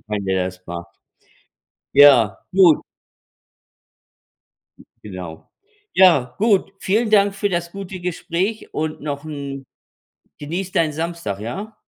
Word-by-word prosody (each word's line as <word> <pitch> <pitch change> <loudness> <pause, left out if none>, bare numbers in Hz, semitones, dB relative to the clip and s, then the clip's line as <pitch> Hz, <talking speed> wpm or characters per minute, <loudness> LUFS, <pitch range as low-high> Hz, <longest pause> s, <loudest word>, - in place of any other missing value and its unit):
wenn 105 -2 -3
der 95 -1 0
das 90 0 -9
macht. 85 0 -6 1.1
Ja, 120 -9 +6
gut. 180 -5 +5 2.2
Genau. 90 -5 -9 0.4
Ja, 160 -10 +4
gut. 200 -3 +2
Vielen 215 +3 0
Dank 200 -2 +4
für 205 0 -1
das 170 -1 -2
gute 195 -2 -7
Gespräch 180 +4 -3
und 155 0 -3
noch 145 -1 -4
'n 140 -3 -7 0.7
genieß 175 +6 -5
deinen 160 -2 +1
Samstag, 165 - -4
ja? 200 - -6
160 Hz, 110 wpm, -20 LUFS, 120-190 Hz, 2.2 s, Ja